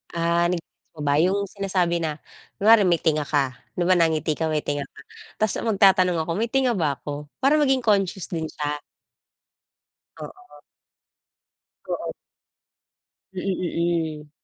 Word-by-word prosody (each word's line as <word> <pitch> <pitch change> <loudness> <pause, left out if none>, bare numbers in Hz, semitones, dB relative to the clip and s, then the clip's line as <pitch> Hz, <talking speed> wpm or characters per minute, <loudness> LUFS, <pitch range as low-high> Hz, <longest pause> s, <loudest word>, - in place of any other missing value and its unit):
Ah, 170 +1 +2
na-gets 175 -2 -6
mo 155 - -8
ba 145 0 +2
yung 190 +4 +2
sinasabi 185 -4 0
na, 155 -2 -2 0.4
kunwari 210 -1 +5
may 175 - +4
tinga 155 -3 +1
ka, 135 -4 0 0.2
'di 175 - 0
ba 185 +2 +4
nangiti 160 -2 +2
ka, 160 - 0
may 155 -1 -1
tinga 145 -1 -3
ka? - - -18 0.4
tapos 215 -2 +1
magtatanong 190 -4 +4
ako, 170 - -3
"May 230 - +1
tinga 260 -1 +2
ba 155 -8 0
ako?" 145 0 -7 0.2
Para 290 +3 +4
maging 265 -3 +2
conscious 195 -4 +1
din 160 -2 -2
siya. 150 -1 -4 1.4
Oo. 370 -1 -12 1.3
Oo - - -4 1.2
Mm, 185 - -3 0.8
mm. 150 - -21
175 Hz, 140 wpm, -24 LUFS, 155-200 Hz, 1.4 s, kunwari